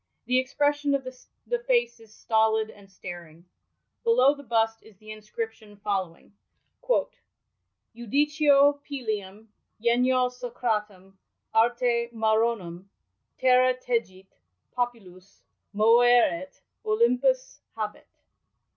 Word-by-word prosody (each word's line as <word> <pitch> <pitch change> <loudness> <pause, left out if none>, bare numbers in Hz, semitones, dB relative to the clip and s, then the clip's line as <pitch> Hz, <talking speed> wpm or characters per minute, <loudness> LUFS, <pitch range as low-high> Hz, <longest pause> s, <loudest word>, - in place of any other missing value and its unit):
The 255 0 +2
expression 290 +2 0
of 275 - -2
the 255 - -7
face 480 - 0
is 225 -2 -18
stolid 220 0 +1
and 200 -1 -18
staring.' 175 -3 -11 0.6
Below 460 - +4
the 285 - -12
bust 225 -3 0
is 220 -3 -19
the 215 +2 -16
nscription 215 -1 -8
following:— 195 -4 -4 0.5
•• - - +1 0.9
Ivdicio 285 +3 +3
Pylium, 215 -7 -5 0.3
genio 250 +2 +2
Socratem, 215 -6 -4 0.4
arte 235 +1 +2
Maronem, 220 -5 0 0.5
Terra 255 0 +4
tegit, 230 -7 -4 0.4
popylvs 200 -7 -5 0.3
moeret, 225 -4 +3 0.2
Olympvs 250 - +1 0.2
habet." - - -5
235 Hz, 95 wpm, -26 LUFS, 210-255 Hz, 0.9 s, Below